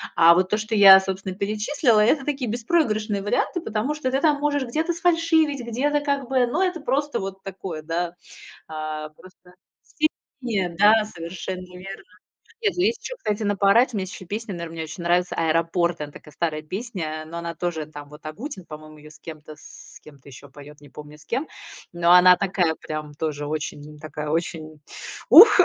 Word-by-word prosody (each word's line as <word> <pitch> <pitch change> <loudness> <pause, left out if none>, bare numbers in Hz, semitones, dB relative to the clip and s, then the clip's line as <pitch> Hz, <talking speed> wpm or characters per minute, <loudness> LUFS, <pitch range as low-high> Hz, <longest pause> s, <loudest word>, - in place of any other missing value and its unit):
А 170 0 +7
вот 185 +1 +1
то, 210 - +1
что 215 +1 -3
я, 195 -2 +10
собственно, 190 0 -4
перечислила, 215 +4 +1
это 270 +6 +3
такие 275 -5 -2
беспроигрышные 220 -5 0
варианты, 330 - 0
потому 225 +6 -2
что 260 -4 -2
ты 270 - 0
там 300 -3 +3
можешь 290 -1 0
где-то 315 +8 -1
сфальшивить, 330 -5 +2
где-то 290 +6 0
как 280 -3 -2
бы 260 -2 +3
но 315 +10 0
это 360 -2 -1
просто 285 +2 -1
вот 195 0 -6
такое, 185 -4 -6
да. 170 +2 -3 0.5
А 155 -1 -5
просто 180 +2 -19 0.9
себе, 205 -8 -1
да, 215 +3 +6
совершенно 180 0 -7
верно. 195 +2 -9 0.6
Нет, 415 -3 +1
ну, 355 - -1
есть 455 +3 +1
еще, - - -5
кстати, 210 - -2
на 205 0 0
поорать, 225 +6 +4
мне 200 -3 -1
есть 185 -1 -9
песни, 215 +2 -5
наверно, 170 -2 -6
мне 160 -1 -4
очень 160 +3 -8
нравится 175 +1 +1
"Аэропорт", 165 +1 0
она 145 -1 -5
такая 150 0 -14
старая 155 -2 -2
песня, 160 -4 -5
но 165 +2 -8
она 170 0 -5
тоже, 165 -2 -3
там 145 -1 -11
вот 150 +1 -15
Агутин, 185 - -7
по-моему, 155 0 -11
ее 150 0 -14
с - - -17
кем-то, 155 -1 -10
с - - -14
кем-то 140 -3 -17
еще 140 +1 -13
поет, 145 +1 -14
не 145 - -15
помню 150 +2 -12
с 150 - -18
кем. 260 - -2 0.5
Но 175 0 +2
она 180 0 +8
такая 180 -4 0
прям 155 -1 -6
тоже 145 -1 -4
очень 150 0 -5
такая, 150 -1 -6
очень 155 -1 -3 0.5
ух, 430 -4 +10
185 Hz, 185 wpm, -23 LUFS, 155-240 Hz, 0.9 s, я